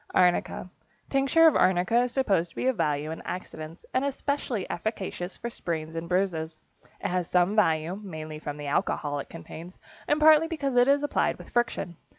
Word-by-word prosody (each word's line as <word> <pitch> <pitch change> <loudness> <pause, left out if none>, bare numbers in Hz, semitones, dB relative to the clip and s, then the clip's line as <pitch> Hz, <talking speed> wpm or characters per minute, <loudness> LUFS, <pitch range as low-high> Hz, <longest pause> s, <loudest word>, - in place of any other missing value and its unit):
=Arnica.= 180 0 +2 0.4
Tincture 275 +4 +4
of 320 - +6
arnica 185 +6 +3
is 250 - -5
supposed 195 -11 +1
to - - -23
be - - -2
of 260 -1 +2
value 150 -3 -1
in 160 - -6
accidents, 160 -2 -7
and 255 - +2
especially 280 -6 -2
efficacious 190 -2 -4
for 235 - -5
sprains 160 -5 -4
and 165 +1 -5
bruises. 165 -4 0 0.4
It - - -1
has 180 -1 -1
some 180 +3 +3
value, 165 -4 +2
mainly 155 -5 -7
from 145 -1 -5
the 145 - -7
alcohol 145 0 -1
it - - -7
contains 165 +2 -10 0.3
and 295 - +2
partly 310 +1 +7
because 285 -6 -2
it 245 +1 +5
is 285 +1 +4
applied 290 - +1
with - - -13
friction. 230 -8 -1
180 Hz, 180 wpm, -27 LUFS, 160-250 Hz, 0.4 s, partly